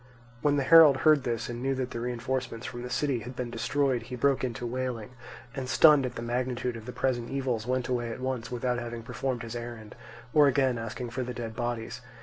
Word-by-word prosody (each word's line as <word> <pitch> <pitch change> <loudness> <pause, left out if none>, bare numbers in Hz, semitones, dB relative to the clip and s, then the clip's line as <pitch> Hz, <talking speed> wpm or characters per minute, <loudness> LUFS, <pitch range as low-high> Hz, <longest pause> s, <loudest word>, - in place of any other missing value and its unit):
When 145 -1 +3
the 140 - +1
herald 155 -2 +8
heard 155 -3 +5
this 115 -2 -1
and 120 0 -5
knew 135 +1 0
that 130 -1 -3
the 115 - -4
reinforcement 125 0 -3
from 120 -1 -6
the 125 - -6
city 130 0 0
had 120 +3 -8
been 125 -1 -4
destroyed, 130 +1 0
he 125 +2 -7
broke 135 +2 +2
into 120 -1 -3
wailing 125 -2 -3 0.4
and, 130 -1 -4
stunned 150 -1 +6
at - - -8
the 115 - -5
magnitude 125 0 -2
of 115 -1 -9
the - - -4
present 120 -2 -1
evils, 125 -5 -2
went 130 -1 0
away 120 -2 -1
at 115 - -6
once 130 -2 -3
without 125 0 -1
having 120 -1 -6
performed 125 0 -3
his 115 0 -6
errand, 120 -3 -7 0.4
or 150 -1 +7
again 130 -3 +2
asking 115 +2 -5
for 130 +2 -3
the 125 0 -4
dead 115 -2 -5
bodies. 120 0 -3
125 Hz, 220 wpm, -28 LUFS, 120-130 Hz, 0.4 s, herald